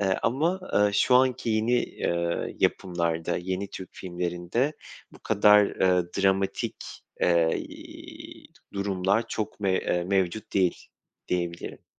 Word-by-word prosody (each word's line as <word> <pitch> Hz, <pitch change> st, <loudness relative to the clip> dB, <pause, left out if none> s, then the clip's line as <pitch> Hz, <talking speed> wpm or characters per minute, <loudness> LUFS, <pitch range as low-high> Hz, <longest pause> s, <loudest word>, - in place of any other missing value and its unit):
Eee, 95 Hz, -2 st, +1 dB
ama, 160 Hz, +11 st, +1 dB
ııı, 105 Hz, 0 st, +3 dB
şu 125 Hz, -, +3 dB
anki 125 Hz, -2 st, +3 dB
yeni, 110 Hz, +2 st, +1 dB
eee, 85 Hz, 0 st, -2 dB
yapımlarda, 85 Hz, -2 st, 0 dB
yeni 95 Hz, +2 st, -3 dB
Türk 95 Hz, -, -8 dB
filmlerinde 90 Hz, -, -2 dB, 0.4 s
bu -, -, -15 dB
kadar, 105 Hz, -1 st, +5 dB
ııı, 90 Hz, -2 st, +1 dB
dramatik, 95 Hz, 0 st, 0 dB, 0.4 s
eee, 85 Hz, -2 st, +3 dB
iii, -, -, -11 dB, 0.3 s
durumlar 100 Hz, +2 st, 0 dB
çok 110 Hz, -1 st, -4 dB
me 95 Hz, -2 st, +1 dB
eee, 90 Hz, 0 st, -1 dB
mevcut 95 Hz, +2 st, -1 dB
değil, 95 Hz, -3 st, +1 dB, 0.4 s
diyebilirim. 85 Hz, -1 st, -3 dB
95 Hz, 120 wpm, -26 LUFS, 90-105 Hz, 0.4 s, kadar